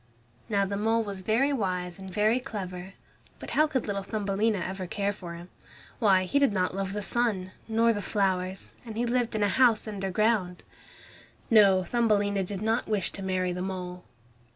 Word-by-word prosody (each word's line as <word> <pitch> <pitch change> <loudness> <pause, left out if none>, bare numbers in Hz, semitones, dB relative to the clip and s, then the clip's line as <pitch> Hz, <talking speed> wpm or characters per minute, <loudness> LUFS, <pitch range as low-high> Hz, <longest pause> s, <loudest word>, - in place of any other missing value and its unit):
Now 200 -2 +2
the 200 +1 -3
mole 225 +2 +2
was 200 -3 -6
very 240 +9 +2
wise 180 -6 -2
and 190 -1 -8
very 215 +5 +2
clever, 190 -7 -6 0.4
but - - -8
how 305 +1 +4
could 265 -5 -1
little 200 -2 -2
Thumbelina 205 +1 0
ever 185 0 -4
care 200 +2 -1
for 175 -4 -8
him? 175 +2 -11 0.5
Why, 195 -5 +4
he 235 +10 +1
did 280 -4 +4
not 185 -3 0
love 195 0 -3
the 210 0 -3
sun, 205 -6 0 0.2
nor 230 +1 +3
the 205 - -3
flowers, 190 -2 -1
and 225 -3 -8
he 240 - +1
lived 240 -1 0
in 210 - +1
a - - +4
house 230 +1 +3
underground. 195 -1 0 0.9
No, 200 -4 +6
Thumbelina 205 -3 +1
did 195 +2 -5
not 225 +2 0
wish 205 -5 0
to 195 - -8
marry 185 -1 -1
the 180 - -4
mole. 180 -1 -5
200 Hz, 180 wpm, -28 LUFS, 185-225 Hz, 0.9 s, No